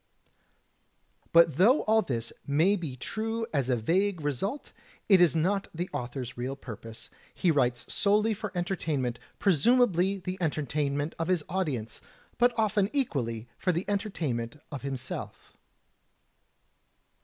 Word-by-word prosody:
' - - -42
" - - -43
But 165 -4 +6
though 230 - +5
all 220 +1 +4
this 115 - -3
may 160 +8 +3
be 160 -9 -5
true 225 - -3
as 135 -3 0
a 125 - +3
vague 180 - +1
result, 150 - -3 0.4
it 195 -3 +6
is 170 -2 +5
not 190 +5 +1
the 175 +3 -3
author's 125 0 -4
real 125 +3 -3
purpose. 115 -3 -10 0.2
He 175 - +2
writes 125 -5 +1
solely 210 +2 +3
for 210 -1 -5
entertainment; 155 -9 -1 0.2
presumably 195 - +3
the 185 0 -5
entertainment 145 -1 -1
of 165 - -1
his 180 -4 +1
audience, 145 - -2 0.4
but 245 +1 +5
often 210 -2 +2
equally 125 - -1
for 185 - +2
the 170 +2 -2
entertainment 155 - -2 0.2
of 145 - -5
himself. 135 -2 -6
165 Hz, 135 wpm, -29 LUFS, 130-200 Hz, 0.4 s, But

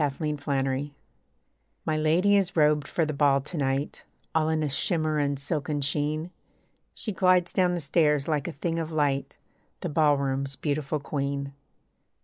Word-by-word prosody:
THE 150 +1 -1
CAPTIVE 135 -2 -1 1.0
My 155 - 0
lady 165 +6 +3
is 195 -2 +1
robed 150 -2 +3
for 165 - 0
the 155 - -3
ball 140 -1 +3
to 150 +6 -9
night, 140 -1 -1 0.3
All 160 -1 +2
in 160 -1 +1
a - - +1
shimmer 155 +2 0
and 140 -1 0
silken 145 +1 -2
sheen. 150 +4 -1 0.6
She 215 - -3
glides 180 -2 +3
down 180 -2 +2
the 175 - -3
stairs 150 -1 +2
like 150 -3 0
a - - -3
thing 165 +4 -2
of 165 0 -4
light, 145 -3 0 0.4
The - - -2
ballroom's 140 -3 +1
beautiful 145 +2 -2
queen. 140 -1 -3
150 Hz, 155 wpm, -27 LUFS, 140-160 Hz, 1.0 s, lady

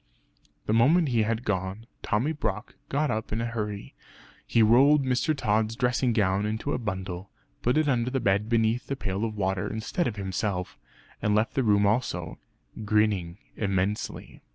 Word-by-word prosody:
The 105 - 0
moment 145 +8 +4
he 120 -3 +2
had 110 +2 -1
gone, 95 +2 -2 0.2
Tommy 120 +9 0
Brock 110 -8 -3 0.2
got 145 0 0
up 110 0 -3
in 110 - -1
a 115 - -1
hurry; 105 -3 -4 0.5
he 115 - +4
rolled 135 +6 +5
Mr. 130 +4 +1
Tod's 110 -2 +1
dressing 125 0 +1
gown 100 -3 +1
into 110 +7 -2
a - - -1
bundle, 95 -3 -5 0.3
put 125 +4 +1
it 155 -1 +2
into 125 -3 +1
the 135 +1 -1
bed 100 0 +1
beneath 115 +1 +1
the 140 - -2
pail 100 -4 -3
of 110 -2 -2
water 95 -2 -1
instead 110 +11 -2
of 115 - -3
himself, 95 -2 -3 0.4
and 105 -1 +2
left 110 +2 +1
the 135 - +1
room 105 -3 +3
also 100 -7 -1 0.4
grinning 100 -5 +1 0.2
immensely. 100 0 -2
110 Hz, 170 wpm, -27 LUFS, 100-125 Hz, 0.5 s, rolled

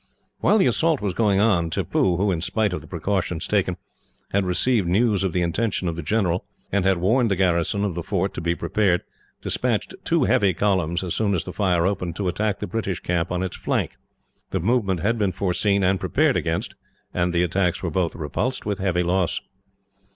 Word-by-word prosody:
While 210 - +4
the 190 - +4
assault 160 -3 +2
was 100 -3 -2
going 100 -1 +2
on, 95 -6 +3
Tippoo 85 +2 +1
who, 100 +2 +1
in 85 -3 -1
spite 105 +2 0
of - - -3
the - - -14
precautions 90 -1 -2
taken, 95 -3 +1 0.5
had 100 -1 +1
received 100 +2 +1
news 100 +2 +2
of 95 - 0
the 90 +1 0
intention 95 +2 -1
of 85 - -2
the 85 - -4
general, 90 0 0 0.3
and 100 -1 +1
had 95 -1 +3
warned 115 +7 +2
the 95 - +2
garrison 90 +2 +1
of 100 - -1
the 85 - -4
fort 95 +2 -1
to - - -5
be 85 +1 0
prepared 100 -3 +1 0.4
despatched - - 0
two - - +2
heavy 95 -4 +3
columns, 90 -2 +1
as 90 - -2
soon 100 -3 +1
as 85 - -1
the 90 - -7
fire 90 -4 +1
opened, 90 -4 -1
to 95 0 -2
attack 105 +3 0
the - - -4
British 100 -5 -3
camp 90 0 -1
on 90 +1 -1
its 95 - -3
flank. - - -1 0.5
The - - -1
movement 100 -3 +1
had 115 +4 +1
been 100 -3 +1
foreseen 100 +2 +1
and 95 +1 +2
prepared 135 - +2
against, 80 0 -1 0.4
and 90 -1 +1
the 85 0 +2
attacks 90 +1 0
were 85 - -1
both 85 0 0
repulsed 90 - -2
with 100 -2 -2
heavy 90 -2 +1
loss. 90 0 +1
95 Hz, 205 wpm, -23 LUFS, 85-105 Hz, 0.5 s, While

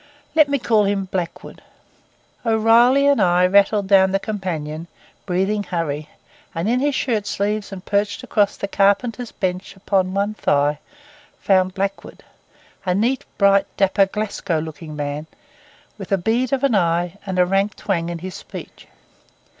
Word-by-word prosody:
Let 310 -2 +5
me 280 - +1
call 220 -5 +2
him 195 -1 0
Blackwood. 180 -2 -5 0.8
O'Reilly 230 +4 +4
and 285 -1 +4
I 180 0 +4
rattled 200 +2 +3
down 190 -1 +5
the 195 - +1
companion, 170 -7 -4 0.4
breathing 195 +3 0
hurry; 155 -5 -3 0.5
and 165 +4 -2
in 245 +3 +2
his 285 +1 0
shirt 220 -6 -1
sleeves 205 +1 -2
and 190 -2 -8
perched 205 0 -1
across 205 -2 +1
the 200 - -3
carpenters 225 +5 +1
bench 185 0 -3
upon 190 -1 0
one 200 +2 0
thigh, 145 -6 +1 0.6
found 185 -1 +2
Blackwood; 195 0 -4 0.6
a 180 -2 0
neat, 240 +6 0
bright, 200 -1 +4
dapper, 195 0 +3
Glasgow 200 -4 -2
looking 155 0 -6
man, 145 +1 -4 0.7
with 195 - -8
a 195 - +4
bead 230 +7 0
of 275 -1 0
an 275 -4 +3
eye 175 0 +1
and 190 -1 -3
a 180 - +5
rank 195 +3 0
twang 170 -4 -2
in 170 - -4
his 185 +2 -7
speech. - - -10
195 Hz, 155 wpm, -21 LUFS, 180-215 Hz, 0.8 s, Let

